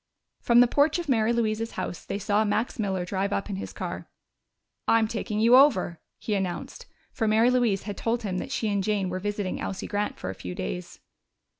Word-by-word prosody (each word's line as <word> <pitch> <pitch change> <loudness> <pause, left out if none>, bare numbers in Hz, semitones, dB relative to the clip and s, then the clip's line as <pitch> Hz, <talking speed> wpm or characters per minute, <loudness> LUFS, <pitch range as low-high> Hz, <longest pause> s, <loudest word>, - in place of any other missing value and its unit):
From 240 0 +5
the 245 - +6
porch 290 +6 +3
of 345 -2 -4
Mary 230 -4 +2
Louise's 225 -1 -1
house 185 -2 -5
they 195 - -3
saw 205 +1 +1
Max 215 +3 -1
Miller 190 -4 -1
drive 195 +2 -1
up 200 +1 -2
in 190 - -3
his - - -6
car. - - -6 0.8
"I'm 225 -1 +4
taking 220 -1 -3
you 230 +3 +6
over," 230 - +4 0.2
he 215 - -3
announced, 185 -3 -3 0.2
for 225 - -1
Mary 225 +3 +4
Louise 235 -6 +2
had 205 0 -6
told 230 +1 -1
him 185 -3 -2
that - - -6
she 220 - -1
and 200 -1 0
Jane 200 -2 0
were 185 - -2
visiting 205 -1 -3
Elsie 190 - -4
Grant 205 0 -2
for - - -4
a - - -6
few 90 -1 -7
days. - - -5
210 Hz, 205 wpm, -26 LUFS, 195-230 Hz, 0.8 s, the